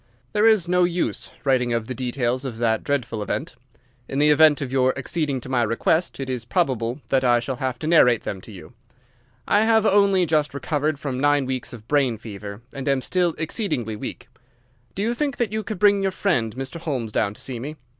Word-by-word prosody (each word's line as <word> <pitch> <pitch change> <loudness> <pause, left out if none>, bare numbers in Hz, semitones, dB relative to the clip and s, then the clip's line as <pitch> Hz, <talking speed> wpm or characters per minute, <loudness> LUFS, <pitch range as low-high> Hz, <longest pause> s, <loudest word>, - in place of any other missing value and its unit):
There 210 +1 +4
is 215 -6 +4
no 180 0 +3
use 175 0 -1
writing 125 -3 +2
of 115 -1 -1
the 130 - -5
details 125 0 -1
of 125 -5 -5
that 115 -1 +1
dreadful 125 -6 -2
event. 105 - -3 0.6
In 135 - -3
the 150 +1 +5
event 150 0 +6
of 135 -4 -4
your 130 0 +2
acceding 140 0 -2
to - - -10
my 130 -2 +1
request 120 +10 0
it 135 - -4
is 125 -3 -3
probable 125 - -1
that 135 -1 +2
I 120 -1 +4
shall 125 +2 -4
have 130 -2 -2
to 155 - -6
narrate 125 -8 +4
them 95 - -5
to 110 - -12
you. 100 +5 -12 0.7
I 205 - +4
have 220 -1 +3
only 200 -3 +4
just 150 -3 +1
recovered 150 +2 -1
from 135 -3 -4
nine 145 0 +3
weeks 130 -1 -3
of 110 -3 -10
brain 135 -6 +2
fever, 105 0 -9
and 135 +1 -6
am 135 -2 +1
still 180 0 +1
exceedingly 155 - -2
weak. 105 - -7 0.7
Do 195 - -2
you 230 +2 +1
think 280 0 -2
that 235 -4 -1
you 220 - -1
could 215 -1 -5
bring 200 +1 +4
your 195 - +1
friend 120 - 0
Mr. 135 +5 -5
Holmes 130 -9 -3
down 105 -1 0
to - - -7
see 125 -3 -4
me? 145 +6 -6
135 Hz, 215 wpm, -23 LUFS, 120-170 Hz, 0.7 s, event